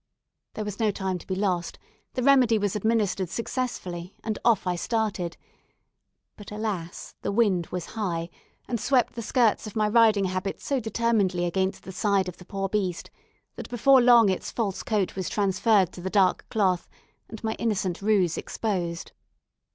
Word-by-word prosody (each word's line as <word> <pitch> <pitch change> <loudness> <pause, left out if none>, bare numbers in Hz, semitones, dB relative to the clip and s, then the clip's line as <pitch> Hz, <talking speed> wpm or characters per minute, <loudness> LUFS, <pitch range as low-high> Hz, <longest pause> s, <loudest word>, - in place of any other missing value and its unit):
There 215 - -3
was 205 -1 -6
no 220 -2 +2
time 190 -2 -2
to - - -15
be 190 - -2
lost; 185 -3 -1 0.4
the 250 - -2
remedy 255 -4 +5
was 205 -1 -1
administered 210 -4 0
successfully, 190 -6 -4
and 220 -1 -3
off 230 -5 +3
I 180 -1 0
started; 200 -3 -2 1.0
but, 205 - -11
alas! 210 -6 -4
the - - -2
wind 200 -6 +2
was 180 -2 -4
high 175 -6 -3 0.4
and 235 - -2
swept 250 +2 +2
the 235 - -5
skirts 225 0 +2
of 210 - -9
my 215 -1 +2
riding 215 -2 +4
habit 185 +1 -3
so 275 -2 -1
determinedly 215 -6 +1
against 190 +2 -1
the 190 - -8
side 195 0 +1
of 180 - -7
the 180 - -14
poor 195 0 -3
beast, 190 -4 -2 0.5
that - - -7
before 255 +2 +5
long 240 -3 +7
its 185 - -2
false 205 -5 -2
coat 210 -4 -1
was 190 -2 -3
transferred 200 -1 +2
to 180 - -10
the 190 - -3
dark 190 -2 +2
cloth, 190 -5 +1 0.4
and 220 0 -9
my 220 0 0
innocent 190 -5 -1
ruse 195 -5 +2
exposed. 175 -6 -3
200 Hz, 170 wpm, -26 LUFS, 185-225 Hz, 1.0 s, long